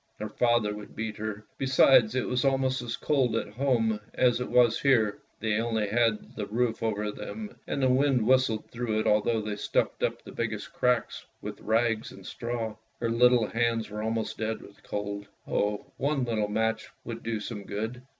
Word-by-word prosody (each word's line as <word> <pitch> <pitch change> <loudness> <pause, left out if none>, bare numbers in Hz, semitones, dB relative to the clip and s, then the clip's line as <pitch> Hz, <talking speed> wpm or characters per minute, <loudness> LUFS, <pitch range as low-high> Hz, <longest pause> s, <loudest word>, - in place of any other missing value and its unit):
Her 105 - -4
father 120 -2 +2
would 105 -1 -10
beat 110 -1 -4
her, 105 -1 -5
besides 130 -3 +5
it 130 - 0
was 125 0 0
almost 135 -1 +2
as 120 -1 -4
cold 130 -6 +1
at 115 - -1
home 115 -4 +1 0.2
as 125 -1 +3
it - - -3
was 120 -2 +4
here. 115 -7 +3 0.2
They 110 0 +1
only 110 -3 0
had 115 -1 +1
the 105 -2 -4
roof 115 +1 0
over 105 -2 -1
them 215 - -7
and 140 - -1
the - - +5
wind 130 -2 +3
whistled 130 -4 +2
through 115 -3 -1
it - - -4
although 110 +2 +3
they 105 -1 -4
stuffed - - 0
up - - -1
the - - -10
biggest 110 -3 -4
cracks 125 -3 +1 0.2
with - - -7
rags 115 0 +1
and - - -13
straw. 115 -2 -4 0.2
Her 115 -1 0
little 120 0 +5
hands 115 +1 0
were 105 0 -4
almost 110 0 -2
dead 110 0 -2
with 100 - -16
cold. 100 0 -4 0.2
Oh, 105 0 0
one 140 -1 0
little 110 -3 0
match 110 +1 0
would 115 0 -6
do 115 -1 -2
some 105 -1 -6
good 110 +5 -4
115 Hz, 190 wpm, -28 LUFS, 105-125 Hz, 0.2 s, besides